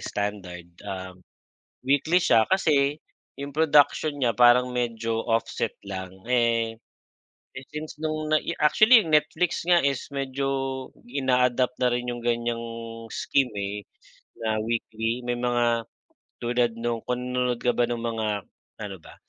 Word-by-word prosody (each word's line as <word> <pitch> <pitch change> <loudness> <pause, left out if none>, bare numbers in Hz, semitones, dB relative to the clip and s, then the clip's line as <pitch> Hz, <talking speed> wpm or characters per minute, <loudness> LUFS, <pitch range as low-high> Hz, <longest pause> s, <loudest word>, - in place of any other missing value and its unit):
standard. 100 -4 -4 0.2
Ah, 95 -2 -6 0.7
weekly 145 +7 +3
siya 115 -9 +4
kasi 150 -5 +2 0.4
'yong 140 0 -5
production 150 -1 +4
niya 120 -4 +1
parang 125 +1 +6
medyo 115 -2 -2
offset 115 -1 0
lang. 95 -2 -6 0.2
Eh, 115 -2 +2 1.0
since 150 0 -6
nung 155 -1 -2
nai 155 - +1
actually 220 +10 +7
Netflix 155 +3 +1
nga 175 -1 +5
is 135 -2 -1
medyo 135 0 -2 0.6
ina-adapt 125 -1 +1
na 125 - +4
rin 120 0 -1
'yong 120 0 -5
ganyang 120 0 -1 0.5
scheme, 135 -3 +1
eh, 100 +1 -3 0.6
na 110 -1 0
weekly. 115 +1 -2
May 120 0 -1
mga 120 -2 +1 0.6
tulad 120 0 +1
noon 115 0 -2
kung 125 0 -1
nanonood 125 -1 0
ka 125 - +4
ba 120 - +3
ng 120 -1 -2
mga 115 -2 -2 0.5
ano 100 -2 -5
ba? - - -14
120 Hz, 130 wpm, -25 LUFS, 115-140 Hz, 1.0 s, actually